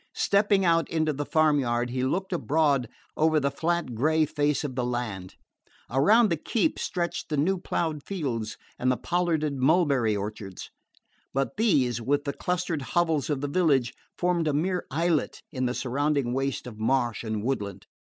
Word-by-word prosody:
Stepping 200 -1 +3
out 165 -1 +3
into 155 -2 0
the 145 0 -4
farm 155 0 +3
yard 120 -1 -1
he 130 0 -1
looked 190 +8 -1
abroad 145 -5 +1 0.3
over 155 0 +3
the 140 -1 0
flat 165 -2 -1
grey 155 +7 +2
face 145 0 0
of 145 -3 -3
the 125 0 -1
land. 120 -7 -4 0.6
Around 205 - +4
the 165 - +1
keep 235 - 0
stretched 175 -1 -3
the 150 - -1
new 180 +6 +1
ploughed 160 -4 -2
fields 130 - -3 0.2
and 130 +1 +2
the 125 - 0
pollarded 165 -5 0
mulberry 135 - +3
orchards; 100 -2 -6 0.6
but 135 0 -1
these, 140 - +2
with 145 +4 +1
the 140 -1 -3
clustered 180 -4 -2
hovels 160 +1 0
of 145 -3 -1
the 145 - -1
village, 140 -6 +2 0.2
formed 175 -2 +1
a 150 - +1
mere 180 +5 -1
islet 160 +2 0
in 130 -4 -1
the 125 - -2
surrounding 140 -1 0
waste 135 0 -2
of 110 -3 -9
marsh 120 0 0
and 110 -2 -3
woodland. 100 -7 -3
145 Hz, 170 wpm, -27 LUFS, 125-165 Hz, 0.6 s, Around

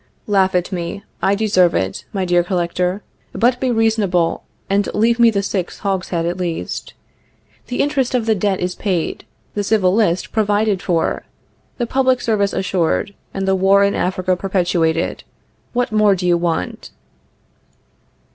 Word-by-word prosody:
Laugh 190 -2 +2
at 180 0 0
me; 180 +2 -4 0.2
I 195 - +3
deserve 190 -5 +3
it, 95 0 -2
my 190 -2 -1
dear 175 -1 +3
Collector. 180 +2 -1 0.3
But 245 +1 +2
be 260 - 0
reasonable, 220 -7 +1 0.2
and 200 +1 +1
leave 230 +3 +2
me 235 -1 +7
the 200 -3 0
sixth 190 -2 -3
hogshead 185 -4 -1
at 175 +1 -2
least. 175 -3 -4 0.7
The 250 - -1
interest 275 -3 0
of 240 -3 0
the 225 - +3
debt 200 -1 0
is 180 0 -1
paid, 185 -6 -2 0.3
the 205 - -1
civil 200 -3 +2
list 195 -5 +1
provided 210 -2 +1
for, 170 -3 -1 0.5
the 240 - -1
public 260 +1 +2
service 205 -4 +1
assured, 190 +1 0 0.2
and 195 0 -3
the 190 - +3
war 195 +1 +4
in 200 0 +2
Africa 185 0 0
perpetuated. 175 -3 0 0.5
What 245 0 -1
more 210 -2 +4
do 180 -1 -4
you 175 -1 +4
want? 170 - -2
195 Hz, 155 wpm, -19 LUFS, 180-215 Hz, 0.7 s, me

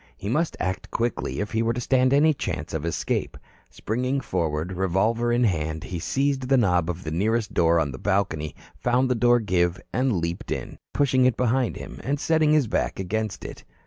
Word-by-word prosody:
He 100 - -5
must 155 +7 0
act 95 0 -3
quickly, 115 -2 -2
if 105 - -4
he 110 - +1
were 115 0 +1
to 125 - -3
stand 130 +1 +2
any 150 +3 +5
chance - - -4
of 80 +1 -2
escape. 85 - -2 0.3
Springing 125 +5 -2
forward, 85 - -2
revolver 95 +6 +1
in 120 +1 +2
hand, 80 -6 0
he 90 -3 -5
seized 135 - 0
the 135 - +5
knob 90 -7 +2
of 90 +1 -4
the 80 - -4
nearest 105 +5 0
door 85 -2 +4
on 75 -4 0
the 65 - -8
balcony, 90 -7 -1 0.2
found 125 +1 +1
the - - +5
door 120 0 +4
give 90 -4 +1
and 130 0 +1
leaped 85 -2 -3
in, - - -4
pushing 130 -3 +3
it 125 -2 +2
to - - +1
behind 125 0 +1
him 65 - -8
and 140 +2 -1
setting 160 -1 +2
his 150 -3 +4
back 110 - -1
against 105 +1 -3
it. - - -8
110 Hz, 205 wpm, -25 LUFS, 90-125 Hz, 0.3 s, any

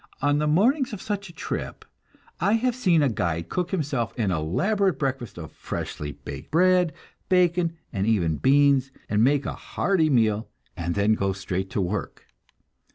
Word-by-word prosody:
On 145 +1 +2
the 150 - +1
mornings 240 - +2
of 205 - -5
such 200 -2 -3
a - - -10
trip 170 - -5 0.5
I 200 +4 +2
have 240 +2 +2
seen 180 -11 +3
a - - +4
guide 85 -6 -2
cook 180 -1 -1
himself 140 - -2
an 105 -5 +1
elaborate 180 - +1
breakfast 130 -7 -3
of 80 -3 -8
freshly 75 -1 -5
baked - - -9
bread, 180 0 +4 0.4
bacon, 175 -2 +2 0.2
and 100 -1 -1
even 85 -9 +2
beans, 140 - +4 0.2
and 105 +1 +2
make 140 +2 +3
a - - -2
hearty 175 -5 0
meal 110 -4 +2 0.3
and 85 0 -3
then 100 +2 +3
go 100 -2 0
straight 95 0 -3
to 100 - -1
work. 95 +3 -4
140 Hz, 165 wpm, -25 LUFS, -, 0.5 s, a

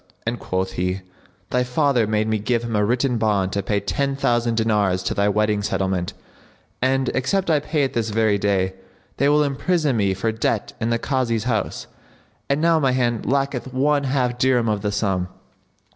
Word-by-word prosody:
and 115 +1 -2
quoth 95 0 -2
he, 90 +1 -2 0.5
"Thy 125 0 +2
father 125 -2 +1
made 110 0 0
me 110 -1 0
give 115 +3 0
him 115 -2 -3
a 105 - +2
written 125 +2 +1
bond 100 -4 +1
to 100 - 0
pay 100 +1 0
ten 140 +7 -1
thousand 120 -3 +1
dinars 105 -5 +1
to - - -1
thy 100 0 +2
wedding 105 0 +1
settlement; 95 -3 -1 0.7
and, 130 0 +1
except 170 +8 0
I 150 - +4
pay 150 0 -1
it 135 - -1
this 115 -1 -1
very 110 -1 +2
day, 95 -2 +1 0.4
they 140 +2 +3
will 150 0 +4
imprison 145 0 0
me 100 -2 +1
for 110 +4 -1
debt 110 -1 -1
in 115 - 0
the 115 - +2
Kazi's 120 -4 -1
house; 115 -3 -2 0.6
and 140 +1 +2
now 165 0 +3
my 135 -4 +2
hand 120 -3 0
lacketh 135 -2 -1
one 140 +1 +2
half 125 -2 0
dirham 125 -2 +3
of 105 -1 0
the 105 0 -1
sum." 95 -3 0
115 Hz, 190 wpm, -22 LUFS, 105-135 Hz, 0.7 s, I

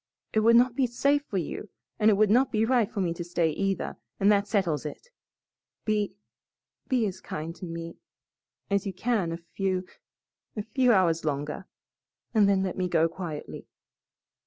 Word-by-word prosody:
It 220 - +3
would 230 +2 +5
not 245 +1 +5
be 260 -1 +2
safe 280 +4 +2
for 200 - -2
you 185 +4 -4 0.3
and 215 0 +5
it 210 - +5
would 210 0 +3
not 255 +4 +4
be 220 0 +2
right 235 -3 +2
for 205 - -2
me 170 -3 0
to 175 - -5
stay, 170 -2 0
either, 195 +4 -2 0.2
and 200 +2 +5
that 200 0 +3
settles 185 -9 0
it. 155 - -8 0.8
Be 210 -3 0 0.7
be 250 -4 +2
as 190 -2 -4
kind 160 +2 -5
to - - -7
me 165 0 -6 0.7
as 200 0 0
you 195 - -3
can 205 -3 0
a 165 - -3
few 185 +2 -2 0.7
a 210 - -1
few 250 +3 +2
hours 175 -6 +3
longer, 150 +4 -3 0.7
and 210 -3 +5
then 195 -1 +3
let 185 -1 -3
me 180 - +1
go 165 -1 +3
quietly." 165 -3 -7
195 Hz, 180 wpm, -27 LUFS, 170-220 Hz, 0.8 s, would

